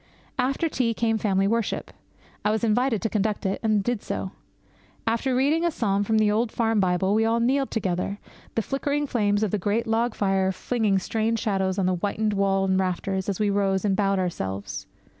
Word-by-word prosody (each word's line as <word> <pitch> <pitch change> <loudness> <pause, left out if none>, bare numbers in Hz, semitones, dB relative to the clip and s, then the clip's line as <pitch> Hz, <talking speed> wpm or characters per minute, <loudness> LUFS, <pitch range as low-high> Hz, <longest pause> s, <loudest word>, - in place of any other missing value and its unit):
After 275 +6 +1
tea 235 -7 0
came 225 -1 +1
family 195 -2 +2
worship. 230 0 -1 0.5
I 210 - +2
was 220 +2 0
invited 230 0 +1
to - - +2
conduct 210 -1 -1
it, 190 - 0
and 215 -3 +2
did 240 -1 -1
so. 190 - -4 0.7
After 235 +3 0
reading 290 +6 +2
a 345 - +3
psalm 205 -9 0
from 220 +2 +1
the 215 -1 +3
old 220 +2 +1
farm 225 -2 +1
Bible, 190 +1 +2
we 220 +1 +3
all 225 +1 +2
kneeled 265 +3 +1
together, 195 -2 -2 0.4
the 225 - +1
flickering 285 +3 -1
flames 205 -5 +1
of 210 - 0
the 210 - 0
great 210 +5 0
log 225 +1 0
fire 195 -1 +1
flinging 215 0 0
strange 225 +4 0
shadows 190 -3 0
on 195 - +1
the 185 - +2
whitened 210 +3 -1
wall 195 -1 +2
and 190 0 +2
rafters 190 +1 -1
as 195 - -2
we 210 -1 +2
rose 195 -1 +1
and 195 -2 +2
bowed 195 -1 +1
ourselves. 100 - -3
210 Hz, 195 wpm, -25 LUFS, 195-230 Hz, 0.7 s, a